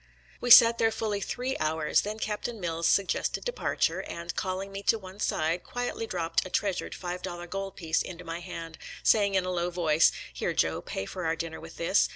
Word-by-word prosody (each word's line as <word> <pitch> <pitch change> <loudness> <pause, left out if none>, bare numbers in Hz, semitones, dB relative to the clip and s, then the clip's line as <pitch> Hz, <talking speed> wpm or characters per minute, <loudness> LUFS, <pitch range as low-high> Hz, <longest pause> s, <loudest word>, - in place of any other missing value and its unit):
We 245 - -2
sat 230 0 +9
there 225 - +4
fully 215 -2 -2
three 250 +5 -2
hours; 155 0 +2
then 210 +1 -4
Captain 220 +1 -3
Mills 165 -2 -1
suggested 200 - +1
departure, - - 0
and, 170 +1 -6
calling 190 +1 -3
me 195 0 -5
to 225 - +3
one 190 -1 -11
side, 165 -2 0
quietly 245 -2 -3
dropped 165 -4 0
a 185 - -8
treasured 195 0 -1
five 180 0 -5
dollar 175 -1 -5
gold 195 +2 -5
piece 165 -2 0
into 180 -1 -7
my 165 +1 -4
hand, 165 -2 -8 0.2
saying 200 -2 +4
in 185 -1 +2
a 185 - -2
low 175 -1 0
voice, 165 -3 +4
" - - -15
Here, - - -2
Joe, - - +1
pay 95 - -4
for 180 - -6
our 160 0 +1
dinner 165 -1 -5
with 165 +1 -11
this. 170 +4 +3
180 Hz, 205 wpm, -28 LUFS, 165-205 Hz, 0.2 s, sat